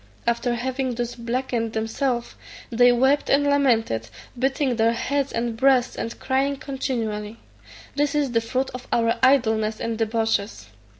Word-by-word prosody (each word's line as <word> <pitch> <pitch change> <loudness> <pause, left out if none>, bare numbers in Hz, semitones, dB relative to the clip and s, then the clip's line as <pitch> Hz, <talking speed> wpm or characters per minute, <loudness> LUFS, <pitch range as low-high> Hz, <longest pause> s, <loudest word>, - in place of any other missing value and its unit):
After 235 +1 0
having 255 +1 -2
thus 240 0 -3
blackened 235 -1 -2
themselves, 235 +3 -2 0.4
they 245 +1 +5
wept 265 +4 +2
and 280 +1 +4
lamented, 235 - +1 0.3
beating 265 -1 0
their 225 +1 +3
heads 280 +3 -1
and 230 0 -2
breasts, 255 0 +3
and 230 - -5
crying 270 +1 0
continually, 230 -6 -4 0.6
"This 290 0 0
is 285 -4 +1
the 230 -1 +2
fruit 260 +3 -2
of 250 0 -9
our 230 -1 +1
idleness 220 -5 +3
and 230 -1 -3
debauches." 225 - -1
240 Hz, 140 wpm, -23 LUFS, 225-265 Hz, 0.6 s, they